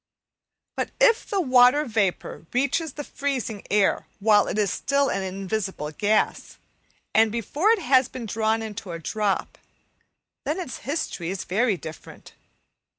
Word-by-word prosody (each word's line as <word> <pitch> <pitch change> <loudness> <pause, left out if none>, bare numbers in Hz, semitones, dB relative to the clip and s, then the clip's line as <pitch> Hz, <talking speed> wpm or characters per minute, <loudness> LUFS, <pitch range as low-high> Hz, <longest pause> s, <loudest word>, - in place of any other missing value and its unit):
But - - -2
if - - +4
the 400 - 0
water 255 -1 +5
vapour 200 -7 -2
reaches 280 +4 0
the 295 - -6
freezing 260 -8 -3
air 205 -1 +2
while 210 0 +4
it - - -3
is 210 -2 +1
still 280 0 +1
an 195 - -1
invisible 190 -4 -3
gas, 210 +7 0 0.6
and 220 0 +4
before 255 - 0
it 445 -5 +3
has 260 -2 +4
been 255 -3 -7
drawn 220 +1 0
into 210 -4 -6
a - - -4
drop, 200 +4 -2 0.8
then - - -2
its 270 -10 -5
history 265 - -3
is 190 0 -3
very 210 +1 +1
different. 160 -2 -11
220 Hz, 145 wpm, -24 LUFS, 200-275 Hz, 0.8 s, water